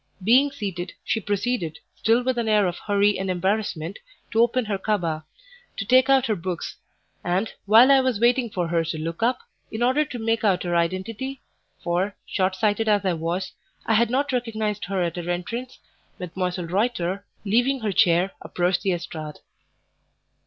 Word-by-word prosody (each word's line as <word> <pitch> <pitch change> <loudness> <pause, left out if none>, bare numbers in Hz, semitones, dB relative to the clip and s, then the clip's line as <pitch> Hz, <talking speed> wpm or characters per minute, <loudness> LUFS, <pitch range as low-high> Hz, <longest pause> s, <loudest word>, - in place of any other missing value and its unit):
Being 255 +8 +5
seated, 195 -10 -5
she 225 - 0
proceeded, 205 -5 -2 0.2
still 230 +3 +2
with 255 -1 0
an 225 -2 -1
air 210 -2 +4
of 175 -1 -2
hurry 205 -1 +2
and 190 0 -2
embarrassment, 190 -1 -1 0.3
to 225 - +3
open 240 +1 +2
her 205 -2 -2
cabas, 175 -7 -1 0.6
to 200 - -3
take 255 +4 +5
out 270 -2 +5
her 215 - +1
books; 180 -1 -5 0.5
and, 185 +5 -1
while 230 +6 +7
I 275 - +7
was 255 -5 0
waiting 240 +1 +3
for 180 -4 -2
her 165 -1 +1
to 165 0 -4
look 165 +3 -5
up, 245 - +1 0.3
in 220 +2 -2
order 260 +5 +3
to 260 -4 -7
make 225 0 0
out 190 -4 +2
her 175 -1 -1
identity 205 +10 -2 0.4
for, 180 +4 0
shortsighted 205 +3 0
as 205 -2 +2
I 185 - +2
was, 170 +3 -3 0.3
I 225 - +2
had 230 +1 +3
not 275 +4 0
recognized 220 -4 -2
her 190 -1 -1
at 170 0 -3
her 175 0 -4
entrance 230 +9 -4 0.4
Mdlle. 180 -1 -3
Reuter, 195 -2 0 0.2
leaving 245 +6 +2
her 215 -2 -1
chair, 180 +1 +3
approached 180 +1 0
the 190 - +1
estrade. 160 -3 -6
205 Hz, 175 wpm, -24 LUFS, 180-235 Hz, 0.6 s, while